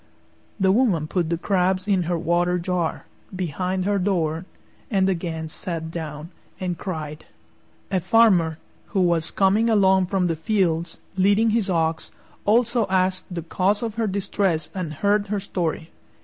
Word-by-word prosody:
The 190 -1 +4
woman 200 -8 +2
put 170 +1 -1
the 170 - 0
crabs 185 +1 0
in 195 -3 +3
her 175 - +1
water 175 +2 +1
jar, 175 -1 -2 0.3
behind 185 +1 -2
her 200 0 +1
door, 175 -3 0 0.4
and 195 -4 +2
again 165 -3 -2
sat 160 0 -5
down 160 0 -6 0.3
and 180 -2 -2
cried. 155 -4 -6 0.7
A 190 - +2
Farmer, 185 -5 +4 0.4
who 190 - +4
was 170 -2 +2
coming 205 +4 +2
along 190 -3 +4
from 190 -1 +1
the 165 -2 0
fields, 170 -2 0 0.2
leading 205 +4 +4
his 215 -3 +1
ox, 165 -2 0 0.4
also 235 0 +3
asked 185 0 +1
the 175 -3 -5
cause 195 +6 0
of 225 -2 -2
her 225 0 -1
distress 190 -4 -1
and 180 -5 -4
heard 205 +6 +1
her 205 0 -1
story. 170 -4 -3
185 Hz, 150 wpm, -23 LUFS, 165-200 Hz, 0.7 s, The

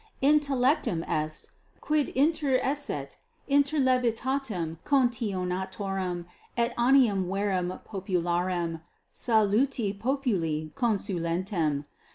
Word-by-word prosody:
Intellectum 275 - +3
est, 155 -1 -2 0.3
quid 300 -2 +1
interesset 275 - 0 0.3
inter 285 +2 +3
levitatem 250 - 0
contionatorum 195 -7 -1 0.3
et 235 0 +1
animum 240 -7 +4
vere 195 0 0 0.2
popularem, 175 -3 -1 0.3
saluti 220 0 +2
populi 200 - -1
consulentem. 175 - -1
210 Hz, 70 wpm, -28 LUFS, 180-265 Hz, 0.3 s, animum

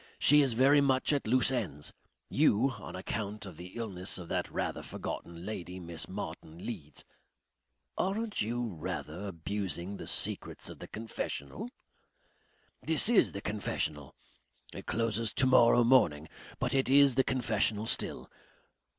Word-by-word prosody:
She 150 +1 +7
is 135 -4 +2
very 135 +5 +5
much 135 +1 +3
at 140 -6 -1
loose 130 +3 +4
ends. 90 - -2 0.3
You 125 +7 +3
on 105 -5 -9
account 105 +2 -4
of 90 -5 -10
the 90 +1 -10
illness 100 -5 -3
of 90 -2 -9
that - - -1
rather - - -3
forgotten 85 +1 -6
lady, 95 -3 -6
Miss 85 -2 -5
Martin 80 +3 -7
Leeds 85 -11 -6 0.5
" - - -51
"Aren't 210 +4 -1
you 120 +3 -1
rather 85 +2 -5
abusing 95 +1 -3
the - - -8
secrets - - -1
of - - -10
the - - -8
confessional?" 110 - -5 1.1
"This 160 +6 +5
IS 240 - +4
the 100 - -5
confessional. 80 -9 -3 0.6
It - - -9
closes 115 -1 0
to 130 - +4
morrow 120 -2 +6
morning 85 - +3 0.3
but - - -1
it 135 -1 +1
is 140 0 +6
the 130 +2 +3
confessional 110 -4 +1
still. - - 0
110 Hz, 145 wpm, -31 LUFS, 90-130 Hz, 1.1 s, She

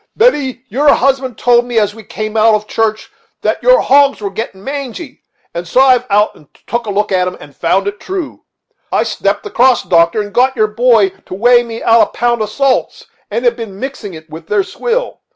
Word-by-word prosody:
Betty, 285 - +1
your 280 +6 +3
husband 265 -2 0
told 240 -1 +3
me, 240 -1 -4
as 210 -1 +2
we 220 0 -12
came 215 +2 -6
out 220 0 +4
of 210 0 -3
church, 215 0 -2 0.3
that - - -1
your - - +5
hogs 280 0 +3
were 200 -2 -4
getting 195 -2 -6
mangy, 275 +1 -6 0.3
and 170 +1 -5
so 250 - +1
I 265 0 +6
have 250 0 +1
been 200 - +2
out 210 +1 +2
to 150 - -20 0.2
take 235 -1 -3
a - - -2
look 205 +1 -1
at 185 -1 +2
them, 180 - -5
and 145 - -14
found 190 +4 0
it 205 +1 -4
true. 370 -5 -6 0.5
I - - +2
stepped - - -2
across, 255 - +2
doctor, 170 +3 +2
and 205 -1 -5
got 260 +2 +2
your 215 -3 +2
boy 225 -2 +3 0.2
to - - -6
weigh 240 +4 +4
me 230 -1 -7
out 230 0 +5
a - - +5
pound 240 0 +1
of 215 - -2
salts, 275 +2 -1 0.2
and 240 - -3
have 240 -1 +3
been 220 -5 -8
mixing 250 -8 -6
it 160 0 -12
with 160 +1 -11
their 210 -1 +1
swill. 485 - -3
230 Hz, 225 wpm, -14 LUFS, 205-260 Hz, 0.5 s, I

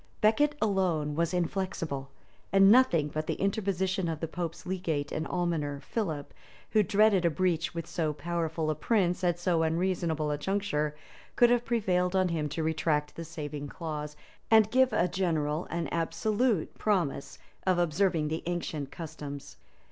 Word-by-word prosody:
Becket 290 +8 +3
alone 180 -8 +1
was 165 +2 0
inflexible; 170 -6 -2 0.4
and 195 0 +7
nothing 175 - +5
but 155 +1 -4
the - - 0
interposition 190 -2 0
of 160 -2 -3
the 165 - -2
pope's 165 0 -5
legate 170 -6 -2
and 155 - -2
almoner, 165 -5 -1
Philip, 155 -6 -3 0.4
who 215 - +5
dreaded 205 -2 +4
a 170 - +4
breach 165 0 0
with 165 -1 -3
so 160 -3 -1
powerful 160 +1 -2
a - - +1
prince 180 +3 +1
at 175 -1 +2
so 175 -2 +1
unseasonable 160 -2 0
a 145 - -2
juncture, 150 -5 -1 0.4
could 240 0 +5
have 240 -1 +3
prevailed 185 -6 +1
on 185 -1 +3
him 155 -3 -1
to 160 +3 -3
retract 155 -2 0
the 165 - -5
saving 150 -3 -6
clause, 150 -1 -5 0.3
and 220 -1 +5
give 260 0 +4
a 175 - +2
general 165 -4 -1
and 170 -1 -2
absolute 205 +5 0
promise 170 -10 0 0.3
of 185 -1 +4
observing 170 -2 +1
the 160 +1 -2
ancient 160 -5 -3
customs. 150 -4 -8
170 Hz, 155 wpm, -29 LUFS, 155-190 Hz, 0.4 s, and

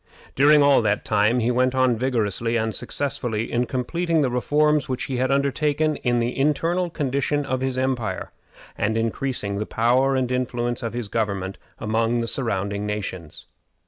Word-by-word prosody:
During 145 +2 +5
all 140 -3 +5
that 105 -2 0
time 105 +3 +2
he 115 +2 +1
went 130 +1 +1
on 130 -2 +3
vigorously 115 -2 0
and 110 -1 -1
successfully 120 -3 -3
in 120 +1 0
completing 160 +5 0
the 130 - 0
reforms 150 +4 +2
which 130 - -2
he 130 -3 -3
had 130 +1 +1
undertaken 145 +2 +1
in 120 -1 0
the 120 +1 -1
internal 165 +5 +1
condition 145 -1 -1
of 130 -1 -2
his 130 -1 -1
empire, 130 -4 -2 0.4
and 110 +2 0
increasing 115 -2 -2
the 105 - -3
power 130 +4 +2
and 130 -1 0
influence 120 -1 -1
of 115 -2 -4
his 120 -3 -4
government 100 -3 -2 0.2
among 115 +2 0
surrounding 100 -4 -1
nations. 95 -6 -5
125 Hz, 160 wpm, -23 LUFS, 115-135 Hz, 0.4 s, During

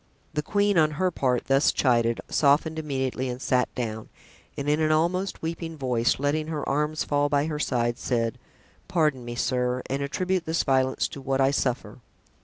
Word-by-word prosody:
The 150 - 0
queen, 205 +2 +2
on 155 -1 +4
her 185 +1 +1
part, 125 -6 0
thus 135 +1 +4
chided, 120 -3 +2
softened 155 +2 +2
immediately 130 -3 -2
and 125 0 -4
sat 125 -1 +1
down, 110 -3 -4 0.5
and 140 - -3
in 150 +1 +2
an 155 -1 +2
almost 175 +5 0
weeping 165 0 -4
voice, 125 -4 +1
letting 150 +2 0
her 155 -2 -3
arms 150 +2 0
fall 145 0 +1
by 145 0 +2
her 155 -2 -3
side, 120 -4 0
said: 115 -2 -1 0.5
"Pardon 150 -7 +1
me, 120 0 -6
sir, 125 0 0
and 135 +1 -1
attribute 180 +5 -1
this 160 +1 +1
violence 130 -1 +1
to 140 - -8
what 135 0 -1
I 135 0 +4
suffer. 125 -5 -2
140 Hz, 180 wpm, -26 LUFS, 125-155 Hz, 0.5 s, on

